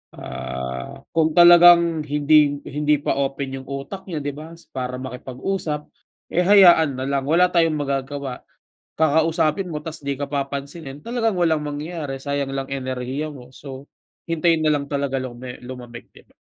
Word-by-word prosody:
Ah, 65 0 -6
kung 160 -1 +3
talagang 175 -2 +7
hindi 145 0 +3
hindi 150 +1 +1
pa - - -1
open 135 -1 -2
yung - - -20
utak 140 +9 -7
niya, 155 -5 -4
'di 145 - -2
ba, 160 +2 -10 0.2
para 125 -1 -4
makipag-usap, 140 +5 -4 0.4
eh 180 - +2
hayaan 175 -7 +6
na - - -2
lang, 140 -1 0
wala 175 +4 +4
tayong 165 -3 +3
magagawa. 140 -2 -3 0.5
Kakausapin 160 +3 +1
mo 150 -1 -5
ta's 160 0 -7
'di 140 0 -2
ka 145 - -2
papansinin, 140 +1 -5
talagang 230 -1 -1
walang 160 -3 +2
mangyayari 150 -1 -5
sayang 140 -1 -2
lang 135 0 -3
enerhiya 130 +2 -3
mo. 125 -4 -12
So, 135 0 -10 0.4
hintayin 165 0 +2
na 155 - +4
lang 140 -1 -2
talaga 140 -2 -1
lume 125 0 -7
lumamig, 125 -2 -10
'di - - -18
ba? - - -30
145 Hz, 155 wpm, -22 LUFS, 135-160 Hz, 0.5 s, talagang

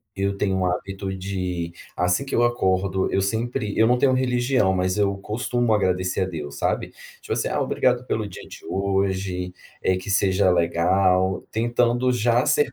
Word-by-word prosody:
Eu 100 0 -1
tenho 95 -1 0
um 95 - 0
hábito 95 +2 -3
de, 90 -3 -4 0.2
assim, 90 +8 +1
que 135 - -3
eu 120 - +3
acordo 95 -5 +1
eu 95 - +2
sempre 110 +1 -2
eu 110 - +5
não 125 +1 +3
tenho 135 +1 +3
religião 125 -4 +2
mas 90 0 0
eu 100 -1 +1
costumo 120 +3 -1
agradecer 90 -3 0
a - - +2
Deus, 75 -6 -6
sabe. - - -1 0.3
Tipo, - - -10
assim: - - -1
"Ah, - - -1
obrigado 125 0 +1
pelo 110 -4 -2
dia 95 - -10
de - - -12
hoje. 95 -2 -1 0.3
Eh, 95 - +2
que 95 - -8
seja 95 -1 +3
legal". 90 +2 +2
Tentando 120 +2 +1
já 120 0 +2
ser 150 - +2
95 Hz, 175 wpm, -23 LUFS, 95-120 Hz, 0.3 s, eu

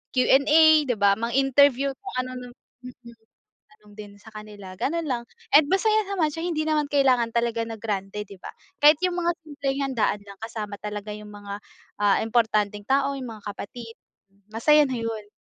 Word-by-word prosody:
Q 255 - +4
and 275 +1 +4
A, 315 +1 +7 0.2
di 245 - 0
ba? 200 0 +5
Mang-interview 270 +3 +3
kung - - -10
ano-ano 250 -1 -8 0.3
mm, 240 -2 -13 0.6
tanong 210 -1 -20
din 205 -1 -10
sa 220 - -21
kanila, 210 -3 -10
ganun 335 +3 -1
lang. 240 -3 -2 0.3
And 290 0 +7
masaya 430 +3 +2
naman 360 -6 +1
siya. 325 +2 -5
Hindi 310 -3 -1
naman 300 -2 0
kailangan 255 -5 +3
talaga 235 -1 0
na 225 - -7
grande, 205 -1 -4
di 200 - -11
ba? - - -9 0.3
Kahit 300 +1 +8
yung 355 - -3
mga 345 0 +1
simpleng 280 -2 -4
handaan 225 -4 0
lang 200 - -10
kasama 215 -2 -5
talaga 210 0 -6
yung 210 0 -11
mga, 205 0 -8 0.4
ah, 205 -1 +3
importanteng 215 -3 0
tao, 275 +1 +1
yung 255 -3 -6
mga - - -26
kapatid, 225 +3 -8 0.6
masaya 300 +7 +4
na 255 - -3
yun. 225 -2 -5
235 Hz, 180 wpm, -24 LUFS, 210-280 Hz, 0.6 s, Kahit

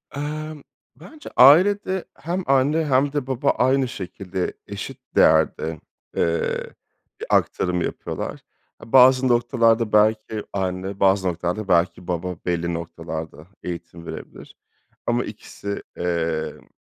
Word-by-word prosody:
Emm, 150 +1 -5 0.3
bence 300 - -12
ailede 185 +7 +5
hem 175 +5 -3
anne 140 +4 +3
hem 140 +1 +2
de 145 -3 -2
baba 135 +1 0
aynı 130 +1 +2
şekilde 95 -3 -4
eşit - - -7 0.2
değerde, 80 0 +3 0.4
eee, 85 0 0 0.5
bir - - -5
aktarım 90 -1 +1
yapıyorlar. - - -4 0.4
A, 115 - -13
bazı 130 0 +7
noktalarda 115 -2 +2
belki 110 0 +2
anne, 95 0 -3
bazı 95 -1 +3
noktalarda 90 +4 -2
belki 85 0 +1
baba 90 0 -2
belli 85 -1 -1
noktalarda 80 -1 -6 0.2
eğitim 85 -1 -7
verebilir - - -9 0.5
ama - - +1
ikisi, 100 0 -7
emm, 85 -2 -2
105 Hz, 115 wpm, -23 LUFS, 85-135 Hz, 0.5 s, bazı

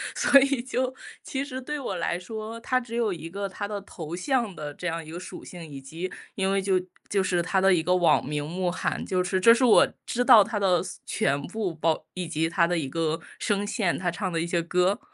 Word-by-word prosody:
所 280 - +6
以 275 -2 +1
就 255 0 -2 0.3
其 270 0 -3
实 260 -2 -5
对 295 +3 -4
我 195 -8 -3
来 170 0 -1
说， 220 +4 -6
他 255 +2 +1
只 235 -2 -10
有 230 -4 +1
一 165 -2 -6
个 200 0 -3
他 205 +2 -5
的 205 -1 -4
头 170 -4 -7
像 230 -1 0
的 145 -1 -5
这 180 - -8
样 165 -1 -2
一 155 - -11
个 175 - -6
属 185 - -9
性， 175 -2 -9
以 140 -3 -9
及 165 +7 -6 0.2
因 195 0 0
为 195 0 +2
就 190 -1 +2 0.3
就 195 -2 +2
是 175 -2 +1
他 190 +3 +1
的 190 0 +5
一 165 - +3
个 180 +3 +2
网 175 -2 +4
名 145 +1 -3
慕 180 +2 -1
寒， 175 - -2
就 185 -1 0
是 185 +1 0
这 230 +5 +7
是 250 +2 +3
我 230 - +7 0.2
知 245 +1 0
道 235 -5 +8
他 210 0 -3
的 185 -3 +3
所 - - -8
全 140 -9 0
部， 195 -3 -3
包 160 0 0
以 180 -2 -4
及 160 0 0
他 170 0 +2
的 175 -1 0
一 145 -4 -2
个 165 +2 -1 0.2
声 205 0 0
线， 205 -4 0
他 175 -2 -1
唱 185 0 -3
的 165 - -1
一 165 - 0
些 170 0 0
歌， 180 +3 +1
185 Hz, 265 characters per minute, -26 LUFS, 170-220 Hz, 0.3 s, 道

